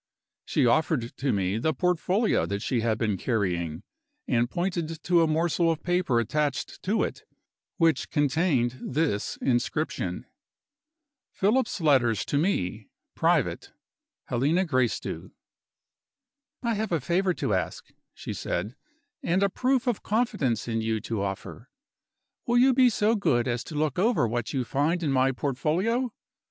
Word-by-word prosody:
She - - +1
offered 125 -1 +1
to 135 0 0
me 100 +1 0
the 155 +6 0
portfolio 180 +4 +1
that 100 +2 -3
she 125 -2 0
had 110 -1 +1
been 105 -3 0
carrying, 90 -7 -1 0.4
and 120 -1 +1
pointed 170 -2 -3
to 175 -1 +4
a 165 - +3
morsel 165 +2 +1
of 160 -1 -1
paper 175 -9 +1
attached 140 +2 -2
to 215 +4 +1
it, - - -4 0.6
which 165 -5 +2
contained 140 -4 +1
this 135 -8 -1
inscription: 135 +5 -1 1.1
"Philip's 225 +3 +1
Letters 130 -8 +3
To 140 - 0
Me. 110 - -1 0.2
Private. - - 0 0.5
Helena 150 +10 +1
Gracedieu." 130 -7 -1 1.3
"I 235 -1 +1
have 220 -1 -2
a 165 - +2
favor 175 +6 +1
to 105 - -1
ask," 90 -3 -3 0.2
she - - -6
said, 105 +8 -3 0.5
"and 185 +4 +1
a 200 - +3
proof 255 +5 +1
of 245 -5 0
confidence 205 - 0
in 115 -1 -1
you 110 0 -1
to 110 -3 -3
offer. 100 +5 -5 0.8
Will 240 0 +3
you 260 +2 +5
be 255 0 +5
so 215 0 +2
good 120 - +1
as 120 -1 -1
to 155 - -8
look 150 0 0
over 190 - +3
what 120 0 -2
you 130 -2 -1
find 160 +8 0
in 145 - +1
my 135 0 +3
portfolio? 170 - 0
150 Hz, 145 wpm, -27 LUFS, 120-180 Hz, 1.3 s, you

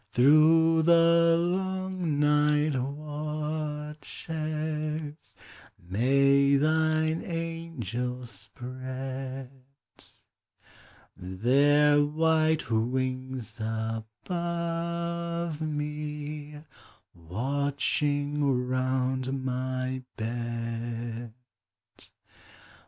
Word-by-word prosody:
Through 160 +5 +6
the 170 0 +5
long 185 -2 -1
night 150 0 +3
watches 150 +1 -4 0.4
May 140 +8 +3
thine 155 +2 +2
angels 125 - -4
spread 130 +5 -6 1.6
Their 140 +10 +3
white 155 -3 +2
wings 130 0 -1
above 170 - -3
me, 150 0 -4 0.5
Watching 140 - 0
round 130 +1 0
my 130 0 -2 0.2
bed. 115 0 -4
145 Hz, 45 wpm, -28 LUFS, 125-155 Hz, 1.6 s, Through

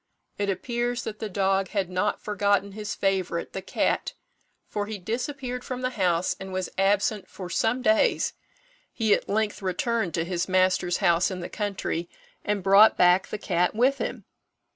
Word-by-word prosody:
It 200 -1 0
appears 240 +4 -2
that 215 -1 -6
the 220 - -4
dog 195 0 +1
had 195 -1 -1
not 185 +3 -1
forgotten 200 -1 +1
his 210 0 -5
favourite, 185 -3 -1
the 190 - -4
cat, 190 - -1 0.5
for 205 -1 -3
he 215 -1 -4
disappeared 250 - -4
from 255 -1 -5
the 255 0 -1
house, 180 -6 +1
and 190 0 -7
was 185 -1 -3
absent 200 +1 +1
for 180 -2 -8
some 240 +8 +1
days. 220 -2 +3 0.6
He 220 -3 +2
at - - -1
length 210 0 0
returned 225 - -1
to 165 -1 0
his 180 +1 -2
master's 185 -1 +2
house 170 +1 +4
in 185 -2 -5
the 175 - -6
country, 195 -5 -3 0.3
and 205 -2 -1
brought 200 +3 +7
back 180 +1 +5
the - - -4
cat 180 -1 0
with 260 +5 +3
him. - - -4
200 Hz, 170 wpm, -26 LUFS, 185-220 Hz, 0.6 s, brought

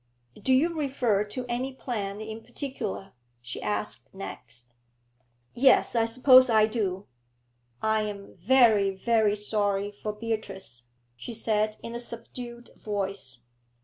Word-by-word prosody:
'Do 260 - +1
you 320 +7 +3
refer 255 -9 +1
to 245 +4 -6
any 245 +3 -2
plan 210 -6 -4
in 220 +1 -6
particular?' 240 -6 -5 0.3
she 120 0 -7
asked 105 +3 -2
next. 120 -9 -7 0.8
'Yes, 260 0 +4
I 225 -1 +4
suppose 255 +2 +7
I 220 -2 +5
do.' 205 -4 -2 0.8
'I 220 0 +2
am 205 -2 -6
very, 215 0 +5
very 210 +2 +2
sorry 205 -1 0
for 210 +1 -5
Beatrice,' 210 - -5 0.3
she 175 - -7
said, 215 -1 +1
in 230 - -6
a 235 - -3
subdued 240 0 -7
voice. 195 - -4
215 Hz, 125 wpm, -27 LUFS, 195-240 Hz, 0.8 s, suppose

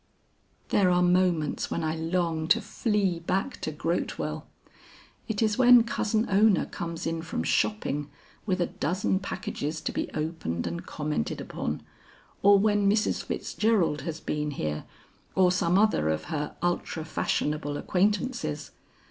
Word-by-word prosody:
"There 190 -3 +4
are 180 0 +3
moments 175 -4 +2
when - - -2
I 155 0 0
long 165 -1 -1
to 165 - +5
flee 205 -4 0
back 195 +9 -2
to 155 - -2
Grotewell. 165 +3 -2 0.8
It 220 -1 0
is 215 0 +1
when 245 -2 +8
Cousin 220 -1 0
Ona 205 0 +4
comes 170 -1 -5
in 165 0 -1
from 165 - -3
shopping 105 - 0 0.4
with 185 -2 +1
a 175 - +2
dozen 190 +4 -1
packages 165 -5 -4
to - - -2
be - - -2
opened 155 - -2
and 170 - -5
commented 150 - -2
upon, - - -4 0.6
or 200 0 +7
when 205 0 +3
Mrs. 210 +1 +1
Fitzgerald 205 -9 0
has 165 -2 -4
been 150 -1 -2
here 75 - -3 0.5
or 185 -1 +5
some 180 0 +2
other 205 - +3
of 80 0 -1
her 150 -1 -3
ultra 175 -2 -1
fashionable 150 -2 -1
acquaintances. 210 - 0
175 Hz, 140 wpm, -27 LUFS, 155-200 Hz, 0.8 s, when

